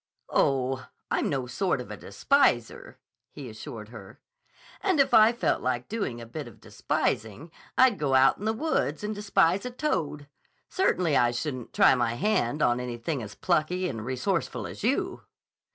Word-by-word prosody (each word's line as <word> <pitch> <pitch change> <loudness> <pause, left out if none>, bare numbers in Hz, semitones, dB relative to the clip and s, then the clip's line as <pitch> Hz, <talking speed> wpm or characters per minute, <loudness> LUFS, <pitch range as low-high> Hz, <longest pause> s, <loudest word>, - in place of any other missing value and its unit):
"Oh, 130 -1 +1 0.2
I'm - - +1
no 135 -3 -1
sort 180 +10 -1
of - - -8
a - - -5
despiser," 285 - 0 0.3
he - - -9
assured - - -9
her. - - -12 0.6
"And 375 -6 +1
if 275 - +3
I 220 +1 +7
felt 240 - 0
like 125 -1 -2
doing 200 - -3
a 115 - -8
bit 115 - -7
of - - -14
despising, 110 +10 -2 0.3
I'd 255 -7 +5
go 140 -3 +1
out 130 +1 +5
in 205 - -6
the 220 - +2
woods 225 - -1
and 210 +1 -2
despise 200 -3 +2
a 250 - -4
toad. 160 - -2 0.4
Certainly 180 - +1
I 120 - +4
shouldn't 125 0 -4
try - - +5
my 120 -2 0
hand 155 - 0
on 120 0 +2
anything 125 +3 -4
as 105 -3 -8
plucky 180 +4 0
and 115 -9 -5
resourceful 125 +1 -2
as - - -8
you." - - 0
150 Hz, 170 wpm, -27 LUFS, 125-210 Hz, 0.6 s, I